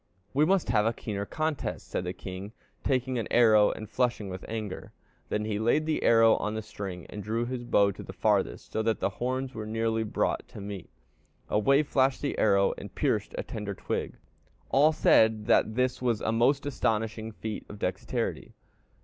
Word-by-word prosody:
"'We 145 +3 +4
must 190 -5 +2
have 110 -2 +3
a 115 - +1
keener 100 -3 -4
contest,' 155 -4 -3
said 90 - -3
the 90 - -2
king, 95 +3 -8 0.3
taking 130 -1 0
an 115 - -3
arrow 110 -3 +6
and 110 - -5
flushing 120 -4 -1
with 95 0 -7
anger; 110 -3 -5 0.4
then 105 0 -1
he 105 -1 -2
laid 120 +8 +2
the 155 -1 0
arrow 115 -1 +5
on 105 +1 -2
the 110 - -3
string 100 -5 -7
and 105 - -7
drew 115 +3 -1
his 125 0 -4
bow 100 -4 +3
to 95 - -9
the - - -8
farthest, - - 0
so 110 - 0
that 110 0 0
the - - 0
horns 130 +1 -1
were 110 -3 -6
nearly 115 0 0
brought 110 - -1
to - - -11
meet. 100 -2 -7 0.6
Away 140 +8 +3
flashed 135 -1 +1
the 145 - -1
arrow, 100 -2 +4
and - - -10
pierced - - 0
a - - -2
tender 100 -2 -5
twig. - - -3 0.6
All 145 +4 +5
said 110 -7 +4
that 110 - +3
this 125 +1 0
was 120 -4 +1
a 110 - 0
most 125 +6 +2
astonishing 110 -4 -1
feat 110 0 -5
of 105 - -8
dexterity. 90 -2 -3
110 Hz, 190 wpm, -28 LUFS, 105-125 Hz, 0.6 s, arrow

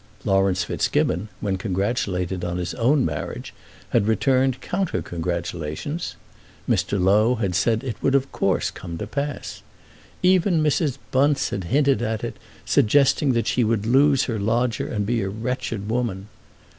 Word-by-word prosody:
Laurence 95 -2 +2
Fitzgibbon, 95 +4 0
when 100 -3 -1
congratulated 95 -2 -1
on 90 0 -2
his 90 0 -3
own 130 +4 +2
marriage, 75 -1 -4 0.4
had 100 - +2
returned 130 +3 +2
counter 190 -1 -2
congratulations. 85 - -4 0.5
Mr. 100 - +1
Low 105 +6 +4
had 100 -6 -1
said 110 +4 +2
that 135 - -4
it 110 - -5
would 135 - +2
of 135 0 +1
course 95 -2 0
come 85 -2 -7
to 105 - -4
pass. 140 +5 -4 0.6
Even 180 -2 +3
Mrs. 150 -2 +1
Bunce 140 +2 +2
had 95 - -3
hinted 140 - +2
at 110 -2 -2
it, - - -4 0.3
suggesting 140 +3 +3
that 115 -1 0
she 125 - +1
would 110 -1 0
lose 135 +3 +4
her 115 -4 -2
lodger 115 +2 0
and 105 -4 -2
be 115 +1 0
a 95 - -2
wretched 110 -1 -3
woman. 110 -4 -2
110 Hz, 155 wpm, -23 LUFS, 95-135 Hz, 0.6 s, Low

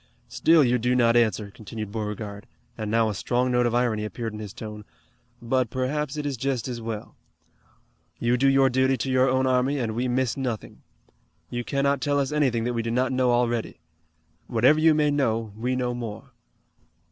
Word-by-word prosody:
"Still 160 -2 +4
you 125 -1 +2
do 125 +2 +1
not 120 -1 +4
answer," 110 -3 +1
continued 110 0 -7
Beauregard, 105 0 -5 0.3
and 110 -2 -4
now 115 +1 +2
a - - -2
strong 125 +5 0
note 125 -1 +3
of 120 - -1
irony 120 -3 +1
appeared 110 +1 -5
in 105 - -7
his 105 -2 -7
tone, 105 0 -8 0.6
"but 125 0 0
perhaps 135 +4 -2
it 150 - -3
is 140 -3 -2
just 130 -1 -2
as 120 -2 -5
well. 110 -2 -6 1.0
You 120 +1 +1
do 135 +2 +2
your 135 0 +5
duty 130 +1 +2
to 130 +3 -2
your 130 +1 +3
own 130 0 +2
army, 130 +2 +2
and 115 -4 -2
we 120 +3 -1
miss 125 -1 0
nothing. 125 -5 -5 0.7
You 120 0 -3
cannot 140 +1 0
tell 145 -1 +1
us 135 0 -1
anything 130 -7 +1
that 120 +1 -1
we 115 - -1
do 115 - -3
not 125 +3 +1
know 130 -1 +2
already. 120 -4 0 0.7
Whatever 125 +6 +4
you 160 0 +5
may 150 -1 +2
know 115 -7 0
we 125 +4 -1
know 125 -1 -1
more. 120 +2 -7
125 Hz, 195 wpm, -25 LUFS, 115-130 Hz, 1.0 s, your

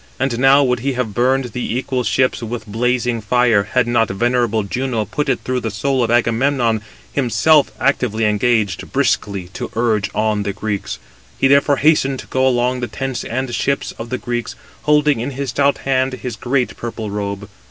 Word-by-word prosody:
And 130 -2 0
now 135 +2 +6
would 125 -2 +1
he 135 +3 -1
have 125 -4 -2
burned 125 +2 +1
the 120 +1 -3
equal 130 -1 -2
ships 130 +1 +1
with 115 0 -5
blazing 120 +2 0
fire, 115 -2 +3
had 125 -2 +3
not 120 -1 +2
venerable 120 +1 +1
Juno 115 +2 -2
put 140 +8 -2
it 130 - 0
into 130 0 0
the 115 - -3
soul 130 +5 0
of 115 - -1
Agamemnon, 120 0 +2 0.3
himself 140 +4 +3
actively 115 -5 +1
engaged, 105 -2 0
briskly 100 -4 0
to - - -6
urge 110 -3 +1
on 110 -1 +1
the 100 -1 -2
Greeks. 105 0 -4 0.4
He 135 - +3
therefore 140 +1 +4
hastened 140 -2 +3
to - - -14
go 130 0 +1
along 125 0 +1
the 120 - -2
tents 135 -2 -4
and 130 +1 -3
ships 140 +4 -1
of 115 +1 -6
the 130 - -2
Greeks, 120 +1 -4 0.3
holding 150 -3 +3
in 120 +4 -2
his 140 -1 -2
stout 140 +3 +2
hand 130 -1 0
his 125 -2 -5
great 125 +2 -1
purple 115 -3 -5
robe. 100 0 -4
120 Hz, 185 wpm, -18 LUFS, 110-130 Hz, 0.4 s, now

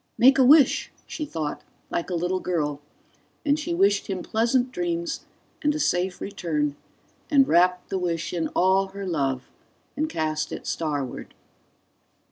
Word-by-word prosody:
Make 265 +3 +6
a - - +7
wish! 280 +2 +5
she 305 - -5
thought, 155 - -4 0.3
like 170 - -2
a 180 - -1
little 180 +2 0
girl, 150 -6 -2 0.6
and 290 +1 +2
she 170 - -2
wished 200 +3 +3
him 190 -2 -3
pleasant 245 +3 +1
dreams 340 0 -3 0.4
and 295 -1 +1
a - - -2
safe 180 -7 0
return 150 -7 -2 0.5
and 275 -4 +5
wrapped 180 +2 +3
the 190 - 0
wish 170 -2 -2
in 165 -2 -1
all 190 +1 +3
her 200 0 -5
love 135 -7 -1 0.5
and 305 +2 -1
cast 155 - -2
it - - -6
starward. 145 -6 -3
185 Hz, 150 wpm, -25 LUFS, 165-260 Hz, 0.6 s, a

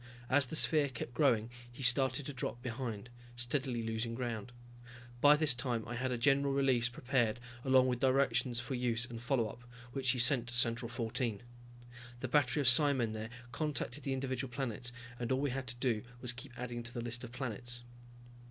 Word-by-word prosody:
As 135 0 +4
the 140 - -3
sphere 150 -2 +3
kept 120 -1 -6
growing 120 -6 +2 0.2
he 130 +3 -7
started 130 +2 +5
to 145 - -5
drop 125 -2 -4
behind, 120 -2 -5 0.2
steadily 120 0 0
losing 115 +1 -2
ground. 120 -2 -4 0.7
By 145 +1 +8
this 150 -2 +3
time 120 -2 -2
I 120 - -5
had 125 +2 -2
a 125 - -1
general 140 +3 +3
release 130 -3 +2
prepared, 120 -2 0 0.2
along 130 -1 +5
with 125 -2 0
directions 125 -2 +2
for 125 +3 -5
use 120 -2 0
and 120 -2 -8
follow 120 -2 +1
up, 115 - -10 0.3
which 135 -2 0
he 130 - +3
sent 125 0 +4
to 120 - -5
Central 120 0 +2
14. 115 -1 -2 0.8
The 130 - -3
battery 145 +1 +2
of 135 - +1
psimen 125 -3 +5
there 110 0 -5 0.2
contacted 150 +2 -2
the 135 -1 -2
individual 130 -1 -3
planets 120 -2 -3 0.3
and 120 0 -3
all 130 - +2
we 140 -1 0
had 130 0 -4
to 120 - -5
do 120 -3 0 0.2
was 125 -1 -1
keep 125 +1 -9
adding 120 -1 -4
to 115 0 -5
the 120 - -2
list 120 +1 -3
of 120 - -8
planets. 120 -1 -3
125 Hz, 190 wpm, -34 LUFS, 120-135 Hz, 0.8 s, By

